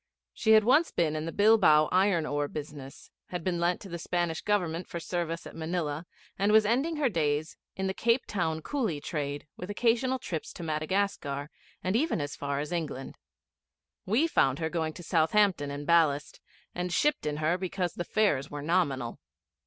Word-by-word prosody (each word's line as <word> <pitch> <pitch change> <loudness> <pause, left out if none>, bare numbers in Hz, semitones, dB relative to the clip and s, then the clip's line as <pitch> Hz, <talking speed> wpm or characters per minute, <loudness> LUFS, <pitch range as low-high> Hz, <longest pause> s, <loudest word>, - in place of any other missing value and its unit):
She 220 - +3
had 215 0 +7
once 295 +9 +4
been 155 -3 0
in 155 +1 -3
the - - -3
Bilbao 200 -8 +5
iron 185 -3 +3
ore 145 -1 -1
business, 145 -2 -8 0.2
had 180 -2 -5
been 175 -1 -1
lent 175 +1 +1
to - - -9
the 170 -2 -6
Spanish 170 -1 -1
Government 180 -4 0
for 170 - -5
service 170 -1 -3
at - - -10
Manilla; 160 -1 -3 0.3
and 200 +2 +3
was 215 0 +6
ending 270 +10 +1
her 300 -3 +2
days 155 -6 0 0.2
in 190 - -2
the 190 - 0
Cape 230 +5 +1
Town 160 -5 -2
coolie 230 - -1
trade, 145 -1 -4
with 180 - -7
occasional 240 +4 +1
trips 170 -10 -5
to 175 - -8
Madagascar 155 -2 -1 0.3
and 185 +3 0
even 300 - +1
as 145 -1 -4
far 140 0 -2
as 150 +2 -4
England. 155 -6 -4 0.9
We 230 - +3
found 135 - +2
her 160 0 -2
going 160 -2 -1
to 175 - -10
Southampton 170 -1 +2
in 145 +1 -5
ballast, 150 -3 +2 0.3
and 180 0 -3
shipped 295 - +1
in 150 0 -2
her 155 +3 +1
because 180 -1 -2
the 175 - -3
fares 175 -10 +1
were 145 -1 -6
nominal. 145 -8 0
170 Hz, 185 wpm, -29 LUFS, 150-200 Hz, 0.9 s, had